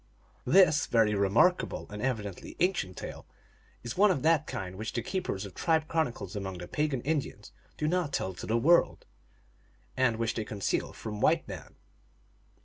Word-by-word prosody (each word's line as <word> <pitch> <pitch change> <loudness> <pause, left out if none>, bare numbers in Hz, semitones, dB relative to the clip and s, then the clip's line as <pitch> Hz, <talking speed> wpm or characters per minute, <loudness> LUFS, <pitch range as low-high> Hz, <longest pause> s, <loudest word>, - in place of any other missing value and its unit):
This 155 -2 +5
very 110 -3 +3
remarkable 105 - +2
and 105 0 -6
evidently 105 -7 -3
ancient 175 - 0
tale - - -8 0.6
is 120 -1 -5
one 205 +3 +5
of 155 -8 0
that 160 -2 +3
kind 95 -1 -5
which 110 +4 -5
the 120 - -2
keepers 115 - -3
of 95 - -9
tribe 160 -2 +1
chronicles 120 - -2
among 95 -2 -4
the 90 0 -8
pagan 150 -4 -1
Indians 140 -8 -3 0.3
do 150 - -1
not 175 -2 0
tell 95 -7 -2
to - - -8
the 115 - +2
world, 170 +8 +3 0.9
and 130 -3 +2
which 115 0 0
they 110 - -2
conceal 105 -2 -2
from 105 -2 -7
white - - +3
men. - - -9
120 Hz, 165 wpm, -29 LUFS, 105-160 Hz, 0.9 s, This